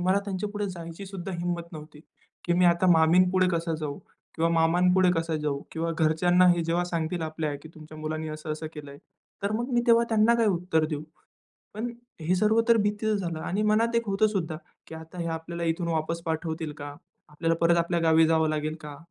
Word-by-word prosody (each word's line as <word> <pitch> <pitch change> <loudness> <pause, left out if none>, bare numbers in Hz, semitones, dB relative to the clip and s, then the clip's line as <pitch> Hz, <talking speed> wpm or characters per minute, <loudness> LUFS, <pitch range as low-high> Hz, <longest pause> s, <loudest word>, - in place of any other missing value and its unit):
मला 185 +2 +2
त्यांच्यापुढे 205 +1 -3
जायची 170 +2 -8
सुद्धा 190 -1 -6
हिम्मत 175 0 -4
नव्हती, 150 -1 -10 0.4
की 175 - +1
मी 180 +1 +3
आता 170 +1 +4
मामीपुढे 180 +3 +4
कसा 165 -1 -1
जाऊ 145 -2 -4 0.4
किंवा 165 +1 +1
मामांपुढे 180 +3 +3
कसा 165 -1 -1
जाऊ 150 -2 -2
किंवा 165 +1 -2
घरच्यांना 175 +3 +4
हे 175 -1 +3
जेव्हा 170 +2 0
सांगतील 170 0 -2
आपल्या, 155 -2 -3
की 160 - -11
"तुमच्या 155 0 -12
मुलांनी 155 0 -4
असं-असं 155 +1 -5
केलंय." 145 -1 -9 0.4
तर 200 +1 0
मग 240 +4 -2
मी 240 - +3
तेव्हा 235 0 +5
त्यांना 225 +1 +4
काय 230 -2 +2
उत्तर 175 -4 +1
देऊ. 150 -1 -3 0.7
पण 235 +3 -3 0.3
हे 170 +4 +1
सर्व 215 +4 +3
तर 230 - +6
भीतीच 210 +1 0
झालं 170 -3 -3
आणि 200 +6 -2
मनात 220 +2 +2
एक 230 -1 0
होतं 200 +2 +3
सुद्धा, 175 -7 -2 0.3
की - - -10
आता 160 +2 -10
हे 170 - -2
आपल्याला 170 +1 -6
इथून 170 +1 -1
वापस 165 +1 -1
पाठवतील 160 -1 -3
का? 145 0 -7 0.3
आपल्याला 165 +2 -1
परत 170 0 +4
आपल्या 170 0 0
गावी 160 -1 +5
जावं 160 -1 +2
लागेल 155 0 -2
का? 150 -1 -9
170 Hz, 190 wpm, -27 LUFS, 160-185 Hz, 0.7 s, तर